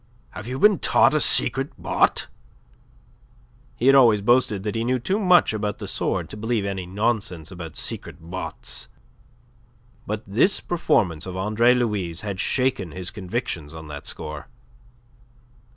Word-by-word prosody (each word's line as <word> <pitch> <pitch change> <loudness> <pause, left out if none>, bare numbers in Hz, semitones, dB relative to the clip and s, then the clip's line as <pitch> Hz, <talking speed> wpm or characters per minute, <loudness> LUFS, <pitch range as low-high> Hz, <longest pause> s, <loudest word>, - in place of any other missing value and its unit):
"Have 105 - -8
you 130 +1 -4
been 205 +1 +5
taught 135 +1 +4
a 155 - +3
secret 135 -1 +3
botte?" - - +1 1.5
He 120 - -2
had 135 - +7
always 115 -7 +5
boasted 115 -4 +2
that 105 - -2
he 115 0 -1
knew 130 +2 +1
too 190 - -1
much 180 - +4
about 105 -2 -2
the - - -7
sword - - -2
to - - -7
believe 110 -1 -1
any 95 -2 -4
nonsense 100 -5 -2
about 85 -4 -8
secret - - -5
bottes; 80 0 -6 1.2
but 105 +1 -3
this 115 - +3
performance 95 - 0
of 90 0 -6
Andre 110 +6 +3
Louis' 100 -8 -1
had 100 -3 -5
shaken 125 - 0
his 90 -1 -5
convictions 95 -7 -4
on 80 -1 -9
that 75 -1 -8
score. 75 0 -6
105 Hz, 150 wpm, -23 LUFS, 95-125 Hz, 1.5 s, had